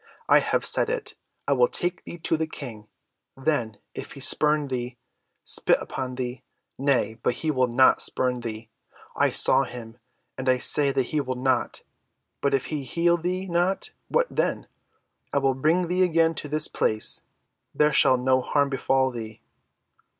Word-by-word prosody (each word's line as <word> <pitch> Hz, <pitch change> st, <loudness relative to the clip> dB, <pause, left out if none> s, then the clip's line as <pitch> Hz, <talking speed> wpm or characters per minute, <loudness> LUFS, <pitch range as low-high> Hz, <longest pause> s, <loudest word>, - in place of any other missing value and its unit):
"I -, -, +6 dB
have -, -, 0 dB
said -, -, +2 dB
it. 485 Hz, -2 st, -4 dB, 0.3 s
I -, -, +3 dB
will 485 Hz, -, +4 dB
take 180 Hz, -, -2 dB
thee 170 Hz, -, -8 dB
to 165 Hz, 0 st, 0 dB
the 160 Hz, 0 st, -2 dB
King, 115 Hz, -9 st, -9 dB, 0.5 s
then 130 Hz, -7 st, -1 dB, 0.2 s
if -, -, -8 dB
he -, -, -11 dB
spurn 150 Hz, -1 st, +3 dB
thee—spit 125 Hz, -1 st, -2 dB
upon 130 Hz, -1 st, -5 dB
thee—Nay, 125 Hz, 0 st, -3 dB
but 120 Hz, -, 0 dB
he 160 Hz, +3 st, -1 dB
will 130 Hz, -3 st, +2 dB
not 125 Hz, +2 st, +4 dB
spurn 125 Hz, -1 st, -1 dB
thee; 110 Hz, -1 st, -7 dB, 0.4 s
I -, -, +3 dB
saw 135 Hz, +1 st, +4 dB
him, 120 Hz, -2 st, -9 dB, 0.4 s
and 130 Hz, 0 st, -1 dB
I 130 Hz, -, +4 dB
say 140 Hz, +2 st, +2 dB
that 135 Hz, -1 st, +1 dB
he 150 Hz, -, +2 dB
will 130 Hz, -2 st, -3 dB
not. 130 Hz, +1 st, -1 dB, 0.6 s
But 140 Hz, -1 st, +2 dB
if 135 Hz, -, -1 dB
he 150 Hz, -, -2 dB
heal 170 Hz, +6 st, +1 dB
thee 180 Hz, +2 st, -3 dB
not, 180 Hz, -, -1 dB, 0.2 s
what -, -, +2 dB
then? -, -, -1 dB, 0.7 s
I -, -, +2 dB
will 135 Hz, -1 st, +2 dB
bring 160 Hz, +7 st, +1 dB
thee 180 Hz, +2 st, 0 dB
again 165 Hz, -2 st, +3 dB
to 150 Hz, -1 st, -5 dB
this 155 Hz, +1 st, +1 dB
place. 110 Hz, 0 st, 0 dB, 0.5 s
There 150 Hz, 0 st, +3 dB
shall 130 Hz, -2 st, +4 dB
no 130 Hz, +1 st, +2 dB
harm 140 Hz, +2 st, +1 dB
befall 135 Hz, 0 st, +1 dB
thee." 110 Hz, -2 st, -8 dB
135 Hz, 165 wpm, -25 LUFS, 125-160 Hz, 0.7 s, I